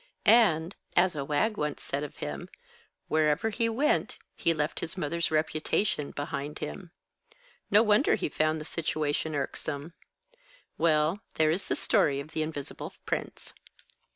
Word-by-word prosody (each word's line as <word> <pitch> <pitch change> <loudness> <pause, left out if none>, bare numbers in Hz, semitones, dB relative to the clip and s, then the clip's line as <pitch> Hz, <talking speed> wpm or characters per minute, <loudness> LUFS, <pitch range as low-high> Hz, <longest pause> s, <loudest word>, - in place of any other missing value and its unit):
And 185 -7 +5 0.2
(as 175 -1 +4
a 145 - -2
wag 155 +10 +1
once 150 -1 -2
said 140 - -2
of 150 - -6
him) 75 -1 -5 0.6
wherever 155 +7 +2
he 230 +2 +1
went, 270 +7 +1 0.2
he 170 - +1
left 155 -1 -1
his 170 - -4
mother's 170 0 0
reputation 155 +1 0
behind 145 +1 -4
him. 180 - -6 0.8
No 210 +2 +6
wonder 215 +5 +4
he - - -1
found 155 +1 +1
the 155 - -7
situation 155 -1 -1
irksome. 145 +2 -3 0.8
Well, 160 +3 +2 0.2
there 155 -1 +4
is 180 +5 -2
the - - 0
story 140 -1 +2
of 140 +2 -7
the 155 - -2
Invisible 155 -3 -5
Prince." - - -4
155 Hz, 145 wpm, -29 LUFS, 150-180 Hz, 0.8 s, No